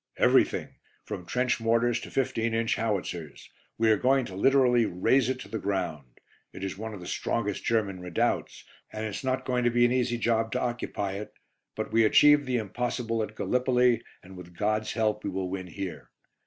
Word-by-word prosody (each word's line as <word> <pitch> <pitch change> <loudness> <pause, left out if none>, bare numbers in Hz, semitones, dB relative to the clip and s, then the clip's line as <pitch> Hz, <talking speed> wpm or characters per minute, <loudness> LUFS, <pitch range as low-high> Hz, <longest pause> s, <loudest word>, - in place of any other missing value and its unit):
"Everything, - - +2 0.3
from 90 - -6
trench 125 0 0
mortars 115 +1 +2
to - - -9
15 115 -4 -1
inch 115 0 +1
howitzers. 90 -8 -4 0.3
We 110 0 +3
are 110 - +4
going 130 +2 +2
to 95 - -8
literally 125 +1 +4
raze 120 +8 +2
it 130 -1 -2
to - - -9
the 110 +1 -4
ground. 90 -10 -3 0.3
It 95 - -8
is 95 - -3
one 110 +2 -6
of - - -9
the 90 - -10
strongest 105 +2 -2
German 105 -5 0
redoubts, 90 0 -1 0.3
and 110 0 -4
it's 105 +3 -5
not 130 0 -1
going 125 -1 0
to 120 - +4
be 120 0 +3
an 120 - +2
easy 125 -1 +1
job 115 -1 0
to 125 - 0
occupy 105 -5 -3
it; 105 - -8 0.4
but - - -4
we 115 0 +5
achieved 145 +5 +6
the 125 -1 +1
impossible 115 +1 -2
at 110 0 -5
Gallipoli, 125 -1 +2 0.2
and 95 0 -13
with 90 -1 -12
God's 110 +2 0
help 110 -1 0
we - - -2
will 95 -1 -3
win 95 -1 -4
here. 95 +1 -7
115 Hz, 195 wpm, -28 LUFS, 100-125 Hz, 0.4 s, achieved